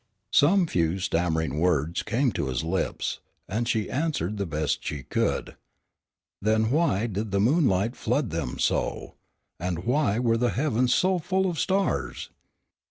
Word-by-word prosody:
Some 180 +6 +5
few 85 - 0
stammering 80 -5 0
words 85 -2 +1
came 125 +3 +1
to 70 - -2
his 65 +3 -2
lips, 90 +4 -2 0.3
and 115 +5 -2
she 110 -2 0
answered 135 - -1
the 100 -2 -2
best 75 -1 -1
she 70 -3 -4
could. - - -1 0.9
Then 110 +2 +2
why 130 - +2
did 105 -1 -3
the 100 +1 0
moonlight 115 - +2
flood - - -1
them - - -3
so, - - -1 0.5
and 90 0 -3
why 125 -3 +1
were 115 -2 +2
the 120 +1 +2
heavens 125 -3 +1
so 185 0 +2
full 190 +3 0
of 170 -4 -2
stars? 195 +1 -1
110 Hz, 150 wpm, -26 LUFS, 90-140 Hz, 0.9 s, Some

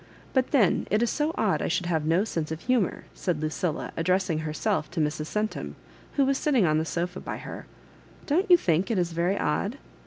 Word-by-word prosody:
But 260 -1 +2
then 230 - +3
it 215 +3 +2
is 235 - +1
so 300 +1 0
odd 210 -3 +1
I - - 0
should 180 +1 0
have 160 -3 0
no 170 +5 +3
sense 165 -8 -3
of 160 +1 -4
humour," 245 -6 +1
said 175 -5 -2
Lucilla, 155 +1 -2
address 185 +2 +1
ing 155 - 0
herself 160 +3 -1
to 170 - -4
Mrs. 150 0 -1
Centum, 215 +3 -3 0.4
who 280 - +3
was 270 0 +1
sitting 265 -10 +3
on 155 -1 +3
the 160 - -1
sofa 175 +3 -3
by - - -5
her. - - -8 0.3
" - - -24
Don't 360 +7 +1
you 355 - +9
think 175 - +1
it 225 - +1
is 175 -1 +1
very 175 +4 0
odd?" 200 - -1
180 Hz, 220 wpm, -27 LUFS, 160-225 Hz, 0.4 s, you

